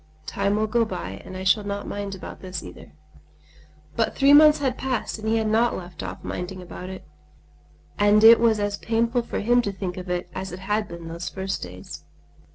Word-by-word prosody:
Time 200 +4 0
will 215 +1 +1
go 230 +2 +2
by 95 - -5
and 185 - -8
I 190 - -5
shall 190 +3 +3
not 200 0 -4
mind 200 -1 -4
about 185 - -9
this 185 -3 -6
either." - - -12 1.0
But 225 - 0
three 280 +1 +5
months 300 0 +8
had 265 -3 -1
passed 255 -5 -3
and 215 - -5
he 225 +1 +2
had 220 - 0
not 225 +2 +2
left 175 -1 -9
off - - -7
minding 180 +1 -5
about 180 +1 -8
it; 190 - -9 0.9
and 205 +1 +5
it 225 +1 +9
was 225 -2 +3
as 205 0 -1
painful 230 +3 0
for 235 - -4
him 240 +3 +4
to 205 - -2
think 190 -2 -5
of 180 0 -7
it 180 0 -2
as 190 0 -5
it 180 +2 -8
had 210 +2 -1
been 170 -2 -9
those 170 +2 -5
first 190 0 -4
days. 90 +1 -9
205 Hz, 210 wpm, -24 LUFS, 185-225 Hz, 1.0 s, it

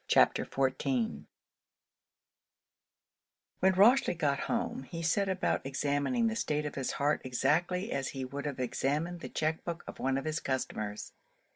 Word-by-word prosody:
CHAPTER - - +4
XIV 130 - 0 2.3
When 190 0 +4
Rochely 205 0 +5
got 140 -3 +1
home, 240 +1 -1
he 165 -1 -5
set 195 +4 +2
about 190 0 0
examining 145 - 0
the 225 0 +1
state 150 -8 -1
of 150 - -3
his 135 -2 -2
heart 145 +2 +1
exactly 165 - +1
as 135 -1 -1
he 135 -1 -4
would 140 +3 -5
have 140 -3 -4
examined 150 +7 -1
the - - -7
check 155 +1 -1
book 170 0 -4
of - - -9
one 135 0 +1
of 135 - -3
his 155 +1 -1
customers. 110 -5 -3
150 Hz, 150 wpm, -31 LUFS, 135-180 Hz, 2.3 s, Rochely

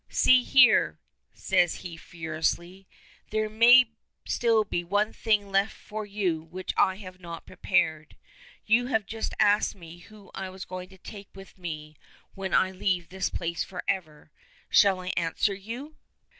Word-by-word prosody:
"See 255 -1 +5
here," 260 -1 +5 0.3
says 175 -1 0
he 170 -2 -6
furiously. 170 +3 -4 0.4
"There 215 0 0
may 235 +2 +6 0.3
still 225 -2 +2
be 175 -4 -3
one 205 +5 0
thing 210 -3 0
left 195 +2 +2
for 215 0 -7
you 190 -6 -1
which 180 +4 -6
I 190 - +3
have 185 -2 -11
not 170 -2 -9
prepared. 160 -5 -1 0.5
You 240 +3 +3
have 220 -5 0
just 225 +2 -5
asked 205 +1 +3
me 170 -2 -12
who 205 +2 -16
I 190 - -5
am 185 0 -11
going 185 0 -7
to 190 - -16
take 200 +1 -11
with 195 0 -13
me 155 -3 -7 0.4
when 195 -1 -5
I 185 - +3
leave 185 -2 -1
this 190 0 -2
place 170 -1 -3
forever. 175 -5 -5 0.4
Shall 195 -2 +5
I 180 - -5
answer 170 +4 +1
you?" 230 +10 -8
190 Hz, 155 wpm, -27 LUFS, 175-215 Hz, 0.5 s, may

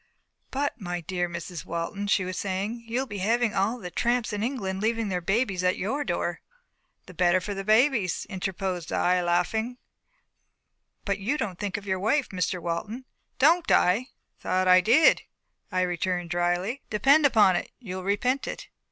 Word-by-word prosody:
"But, 280 -3 -2
my 175 -1 -3
dear 175 +1 -2
Mrs. 170 0 -6
Walton," 170 +5 -4
she 195 -2 +2
was 185 0 -4
saying, 205 +5 -3
"you'll 245 +4 -1
be 205 -6 -6
having 230 +3 +1
all 200 +6 +1
the 180 -6 -8
tramps 240 0 0
in 205 - -2
England 200 -6 -2
leaving 225 -1 0
their 180 -1 -1
babies 195 0 0
at 180 0 +2
your 270 +10 -1
door." - - -2 0.6
"The 185 - -12
better 175 +1 +3
for 205 +3 -5
the 195 0 -5
babies," 220 -3 +2
interposed 190 -3 -4
I, 180 0 +2
laughing. 180 +8 0 1.3
"But 200 0 -1
you 230 +10 -1
don't 195 -9 -4
think 205 -2 -2
of 205 - -9
your 190 -1 -1
wife, 250 +8 +1
Mr. 180 -1 -2
Walton." 190 +9 -4 0.3
"Don't 325 +5 +4
I? - - +6
I 240 +8 -2 0.3
thought 185 0 0
I 185 0 +7
did," 305 - +5 0.5
I 185 - +1
returned 175 -1 -1
dryly. 175 +8 0
"Depend 280 +8 +5
upon 210 -8 +4
it, - - -2
you'll 185 -6 -6
repent 245 +8 0
it." - - -6
195 Hz, 170 wpm, -26 LUFS, 180-235 Hz, 1.3 s, I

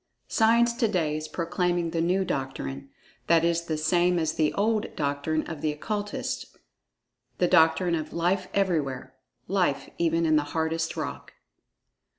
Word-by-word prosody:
Science 235 +1 +3
to 235 -1 +1
day 165 -7 0
is 155 0 -4
proclaiming 175 +1 -1
the 165 - 0
new 185 +3 +1
doctrine—that 135 - -2
is 170 0 +1
the 160 -2 -2
same 175 +3 +2
as 160 -2 0
the 155 -2 +1
"old" 215 +1 +1
doctrine 145 +2 -1
of 160 -3 -7
the 155 - +1
Occultists—the 205 +7 -4 0.9
doctrine 165 +2 +4
of 155 -2 -2
"Life 180 +2 0
Everywhere"—Life 140 -1 -2
even 165 0 +2
in 155 -1 +4
the 150 - +2
hardest 160 0 -1
rock! - - -5
165 Hz, 135 wpm, -27 LUFS, 155-180 Hz, 0.9 s, doctrine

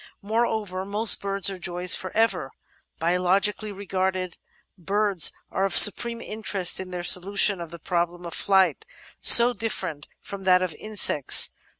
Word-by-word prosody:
Moreover, 215 -3 -3
most 205 +3 +2
birds 195 -1 -3
are 190 - -9
joys 180 0 +1
for 185 - -3
ever. 195 -11 -1 0.5
Biologically 190 +5 -1
regarded, 190 -2 -4 0.4
birds 195 -1 0 0.2
are 190 - -3
of 195 -2 +2
supreme 235 +2 +5
interest 210 -4 -1
in 185 -1 -8
their 180 -1 -7
solution 195 +1 +2
of 170 - -9
the 170 - -11
problem 175 +1 -4
of 170 - -8
flight 195 - 0 0.2
— - - -26 0.2
so 240 +1 +2
different 185 -10 -6
from 195 -1 -11
that 185 -1 +2
of 180 -3 -5
insects. 205 -9 +2
190 Hz, 150 wpm, -23 LUFS, 180-205 Hz, 0.5 s, supreme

